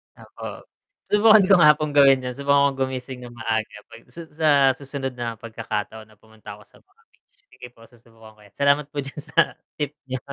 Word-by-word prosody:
Opo. - - -10 0.5
Subukan 215 +1 +6
ko 195 - +5
nga 150 -2 +8
pong 150 -1 -4
gawin 135 -2 +6
'yon, 125 -1 -5
subukan 140 0 +2
kong 135 - -11
gumising 130 -1 -6
nang 120 - -10
maaga 110 -2 -3
'pag 115 - -15
sas 170 -1 -10
sa 160 -1 0 0.3
susunod 135 -1 -6
na 115 -2 -5
pagkakataon 110 -1 -6
na 110 -1 -24
pumunta 110 -1 -14
ako 105 - -18
sa - - -23
mga 395 +4 -33
beach, - - -43
sige 125 - -13
po - - -27
susubukan 115 -2 -19
ko - - -28
'yan, 100 - -20
salamat 140 +1 +2
po 145 - -5
diyan 140 +2 -9
sa 150 +1 +1 0.2
tip 145 0 -3
niyo. 130 0 -4
130 Hz, 205 wpm, -22 LUFS, 115-145 Hz, 0.5 s, nga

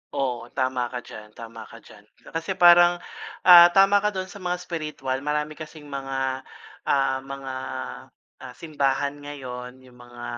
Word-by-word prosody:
Oo, 125 -4 -2
tama 130 -2 0
ka 125 0 -7
diyan, 105 0 -12
tama 115 -1 -10
ka 115 - -14
diyan. 105 - -16 0.3
Kasi 165 +3 -3
parang, 175 -1 +7 0.5
ah, 175 -1 +10
tama 195 +1 +6
ka 210 - 0
dun 190 -2 -4
sa 200 - -11
mga 180 -1 -2
spiritual 150 -7 -4
marami 150 +1 -2
kasing 155 0 -10
mga, 135 -2 -4 0.4
ah, 135 -1 +2
mga, 135 0 -8 0.9
ah, 125 -1 -10
simbahan 145 -2 -1
ngayon 130 -3 -8
yung 125 -1 -19
mga 120 0 -12
135 Hz, 150 wpm, -24 LUFS, 130-165 Hz, 0.9 s, ah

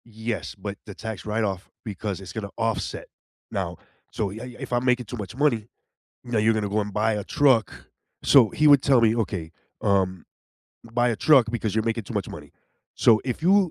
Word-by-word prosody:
Yes, 110 0 -5
but 100 0 -6
the 100 -3 -9
tax 110 -3 -6
write-off 105 -3 -2 0.2
because 100 -2 -4
it's 95 -1 -9
going 110 - -4
to 100 - -10
offset 115 -1 -2 0.4
now, - - -3 0.3
so 105 - -2
you 105 +4 -8
I - - -6
I 125 -1 -10
if - - -6
I'm 120 +1 +1
making 125 -1 +2
too 120 +4 -7
much 105 +2 -7
money, 125 -7 +1 0.6
"Now 120 -2 -2
you're 110 +1 +4
going 110 -1 -1
to - - -2
go 105 +2 0
and 105 0 -4
buy 110 +2 +1
a 105 -1 -3
truck." 130 -8 +2 0.4
So 120 -7 +6
he 155 - +2
would 140 -2 +7
tell 135 -4 +4
me, 115 0 +3
"Okay, 95 -8 -2 0.3
um, 95 -2 +1 0.6
buy 120 +1 +1
a 115 - -1
truck 135 -4 +5
because 115 -3 -2
you're 110 -1 +1
making 115 -1 -1
too - - -8
much - - -2
money." - - -10 0.4
So 110 -2 +5
if 130 +2 -3
you 190 0 +4
110 Hz, 215 wpm, -25 LUFS, 105-120 Hz, 0.6 s, would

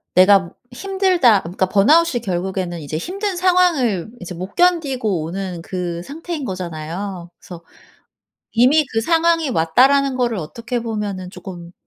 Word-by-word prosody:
'내가 190 -1 +5 0.2
힘들다.' 365 - +2
그러니까 185 +2 -2
번아웃이 265 - +3
결국에는 180 -2 -3
이제 155 0 -5
힘든 390 - -3
상황을 340 - +2
이제 180 -1 -7
못 185 +3 -8
견디고 270 - +1
오는 180 0 -5
그 175 -1 -4
상태인 320 - -6
거잖아요. 175 0 -5
그래서 170 -2 -11 0.9
이미 265 +6 +4
그 225 - +1
상황이 330 +3 +2
왔다라는 260 +10 +3
거를 240 -3 0
어떻게 230 +9 -4
보면은 205 -5 -4
조금 175 -4 -10
210 Hz, 320 characters per minute, -19 LUFS, 180-290 Hz, 0.9 s, 내가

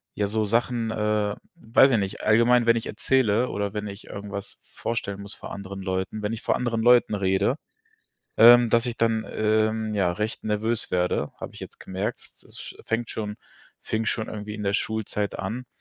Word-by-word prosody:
ja, 105 - 0
so 110 +1 0
Sachen, 115 +1 0
äh, 105 -1 0 0.2
weiß 135 -3 +4
ich 115 - +3
nicht, 100 +1 -4
allgemein, 115 +2 +4
wenn 115 0 +5
ich 115 - -4
erzähle 125 -2 +1
oder 100 0 -3
wenn 105 - -3
ich 100 0 -9
irgendwas 100 0 -7
vorstellen 100 -3 -4
muss 100 0 -9
vor - - -9
anderen 100 -1 -7
Leuten, 95 +3 -3
wenn 105 - -1
ich 115 - -5
vor - - +1
anderen 115 -2 -1
Leuten 120 -1 +5
rede, 95 +7 +1 0.8
ähm, 120 0 +8
dass 115 +2 +3
ich 120 -1 -3
dann, 115 -1 +1
ähm, 110 0 +1
ja, 95 -4 +2
recht 105 +5 -4
nervös 110 +2 -1
werde, 90 -5 0
habe - - -7
ich - - -12
jetzt - - -10
gemerkt, 95 +3 -4
s - - -16
s - - -11
es - - -17
fängt 115 0 -1
schon 105 -1 -4 0.5
fing 110 0 -2
schon 110 0 -1
irgendwie 105 0 -6
in 105 - -6
der 100 -1 0
Schulzeit 105 -1 -2
an 115 +7 -4
110 Hz, 195 wpm, -25 LUFS, 100-115 Hz, 0.8 s, ähm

